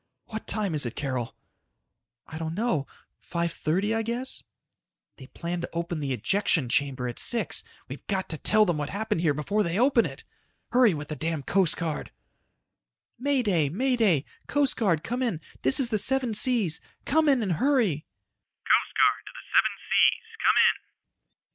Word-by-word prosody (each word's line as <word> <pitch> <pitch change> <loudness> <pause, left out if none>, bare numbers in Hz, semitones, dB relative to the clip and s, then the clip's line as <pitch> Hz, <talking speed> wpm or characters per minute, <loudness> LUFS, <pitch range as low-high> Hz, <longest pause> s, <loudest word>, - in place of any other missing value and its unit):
"What 220 -1 -7
time 205 -5 -1
is 145 -5 0
it, 120 - -7
Carol?" 130 -5 -3 0.9
"I 160 - -8
don't 160 0 -4
know. 195 - -1 0.3
5:30 170 +4 -1
I 225 - 0
guess." 240 +4 -3 0.8
"They 130 - -12
plan 170 +4 -5
to - - -5
open 170 -1 -3
the 140 -2 -3
ejection 160 -1 0
chamber 135 -2 -1
at 120 - -6
six. 235 - +3 0.2
We've - - -9
got 190 -2 -1
to 155 - -3
tell 215 0 +4
them 170 -5 -1
what 145 0 -3
happened 205 -4 -2
here 155 -4 +1
before 200 +9 -1
they 170 -2 -1
open 250 0 +3
it! - - -11 0.5
Hurry 240 -7 +4
with 150 0 -7
the 155 - -4
damned 160 -3 -3
Coast 190 -4 +2
Guard!" 165 -3 -4 1.1
"May 275 0 +1
Day! 170 -9 +1
May 255 - 0
Day! 190 - +2 0.2
Coast 285 -2 +1
Guard 175 -9 +1
come 245 +2 -3
in. 230 -11 -1 0.2
This 130 - +4
is 255 -3 +1
the 215 - +2
Seven 255 +1 +2
Seas. 210 - +2 0.2
Come 310 +1 +2
in 265 -5 +3
and 195 - -1
hurry!" 240 - +1
185 Hz, 155 wpm, -26 LUFS, 155-235 Hz, 1.1 s, tell